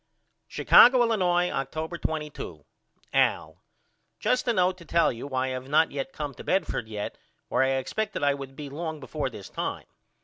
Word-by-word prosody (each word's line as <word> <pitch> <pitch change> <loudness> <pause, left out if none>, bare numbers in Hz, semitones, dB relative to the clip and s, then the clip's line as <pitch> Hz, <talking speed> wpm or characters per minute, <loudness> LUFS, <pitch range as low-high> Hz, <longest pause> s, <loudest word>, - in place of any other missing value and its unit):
Chicago, 250 0 +7
Illinois, 180 -6 +2
October 155 +5 -3
22. 150 - -5 0.5
AL: - - +1 0.6
Just 250 0 +1
a 240 - +3
note 185 -2 +2
to - - -11
tell 170 0 +3
you 120 +3 -7
why 130 -2 -1
I - - -2
have 130 +1 -5
not 155 +2 +4
yet 135 -1 -4
came 145 -1 -5
to - - -11
Bedford 185 - -1
yet 105 -2 -5 0.3
where - - +2
I 130 - +4
expected 195 +9 -2
I 145 0 +4
would 135 -1 -8
be 145 0 -7
long 160 +2 -5
before 140 +1 -3
this 105 -6 -10
time. - - -4
150 Hz, 175 wpm, -27 LUFS, 130-175 Hz, 0.6 s, Chicago